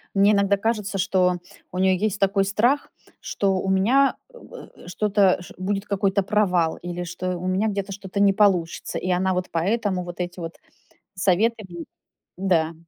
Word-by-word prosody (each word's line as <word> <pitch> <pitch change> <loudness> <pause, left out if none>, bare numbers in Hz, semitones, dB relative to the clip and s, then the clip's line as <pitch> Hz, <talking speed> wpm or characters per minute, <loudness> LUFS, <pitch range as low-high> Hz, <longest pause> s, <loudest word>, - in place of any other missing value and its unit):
Мне 200 +2 +5
иногда 200 0 +3
кажется, 210 -1 -1
что 185 -1 +2 0.3
у 180 - -6
неё 190 0 +3
есть 210 +1 -1
такой 195 0 +2
страх, 235 +8 +1 0.3
что 195 -2 0
у 195 - -3
меня, 240 +9 +3 0.2
м, 485 - -12
э, - - -15
что-то 200 0 +2
ш 175 - -12
будет 195 +2 -2
какой-то 200 0 +1
провал, 185 -5 +1
или 175 0 -5
что 180 +1 -4
у 180 +1 -5
меня 190 +4 +1
где-то 200 -1 -3
что-то 195 0 -6
не 200 -1 +5
получится, 190 -5 +1
и 185 - -3
она 185 +1 +1
вот 180 0 -2
поэтому 190 +2 0
вот 175 0 -9
эти 180 0 -4
вот 165 0 -6 0.6
советы 205 +4 +1
м 170 -2 -8 0.5
Да. 170 -4 +1
190 Hz, 170 wpm, -23 LUFS, 180-205 Hz, 0.6 s, Мне